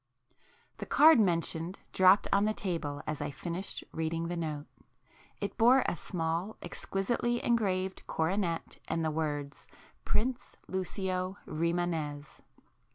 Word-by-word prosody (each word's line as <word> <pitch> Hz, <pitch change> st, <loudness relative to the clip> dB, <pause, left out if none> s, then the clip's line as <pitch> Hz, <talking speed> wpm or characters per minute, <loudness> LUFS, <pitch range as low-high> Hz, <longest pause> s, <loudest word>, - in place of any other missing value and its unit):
The -, -, -5 dB
card 315 Hz, -3 st, +7 dB
mentioned 170 Hz, -2 st, 0 dB, 0.2 s
dropped 190 Hz, +2 st, +6 dB
on 200 Hz, +1 st, +4 dB
the 215 Hz, 0 st, +1 dB
table 165 Hz, -7 st, -3 dB
as 150 Hz, -1 st, -3 dB
I 145 Hz, -, -1 dB
finished 170 Hz, +6 st, -5 dB
reading 165 Hz, +1 st, -2 dB
the 175 Hz, -, -2 dB
note. 155 Hz, -3 st, -3 dB, 0.7 s
It -, -, -4 dB
bore 250 Hz, +3 st, +6 dB
a -, -, 0 dB
small, 170 Hz, +4 st, -2 dB
exquisitely 240 Hz, +5 st, -1 dB
engraved 190 Hz, -5 st, 0 dB
coronet 170 Hz, +1 st, -1 dB
and 165 Hz, 0 st, -1 dB
the 155 Hz, -, +1 dB
words 145 Hz, -2 st, -3 dB, 0.4 s
Prince 250 Hz, +3 st, -1 dB
Lucio 185 Hz, 0 st, -2 dB
Rimânez. 160 Hz, -3 st, -2 dB
175 Hz, 120 wpm, -31 LUFS, 160-195 Hz, 0.7 s, card